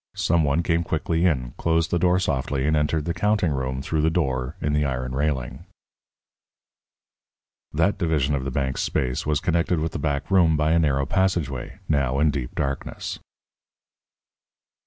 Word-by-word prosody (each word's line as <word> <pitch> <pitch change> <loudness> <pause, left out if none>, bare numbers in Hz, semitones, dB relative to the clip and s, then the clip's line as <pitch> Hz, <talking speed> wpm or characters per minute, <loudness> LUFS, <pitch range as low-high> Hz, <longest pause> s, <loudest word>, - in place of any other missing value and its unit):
Some 85 -1 +2
one 75 +4 +1
came 85 0 +1
quickly 80 +2 0
in, 65 -7 -1
closed 80 0 +1
the 85 - +2
door 90 +1 +3
softly, 70 -6 -1
and 80 +1 +2
entered 75 0 0
the 85 - -1
counting 100 -1 +1
room 65 -1 -2
through 80 +1 0
the 80 - +3
door 65 -5 -1
in 75 - -1
the 75 0 +2
iron 65 -2 -2
railing. 65 -2 -2 2.1
That 85 +8 +1
division 75 -5 +1
of 70 -2 -1
the 70 - -2
bank's 65 0 -1
space 65 +1 -1
was 75 -1 +2
connected 85 -1 +1
with 80 +1 -2
the 85 - -4
back 70 +2 -2
room 85 -5 +4
by 75 +1 +2
a 85 - +4
narrow 70 -4 +1
passageway, 85 -6 -1
now 70 -3 +1
in 75 +1 +3
deep 65 -4 -5
darkness. 70 -1 -3
75 Hz, 165 wpm, -24 LUFS, 70-85 Hz, 2.1 s, room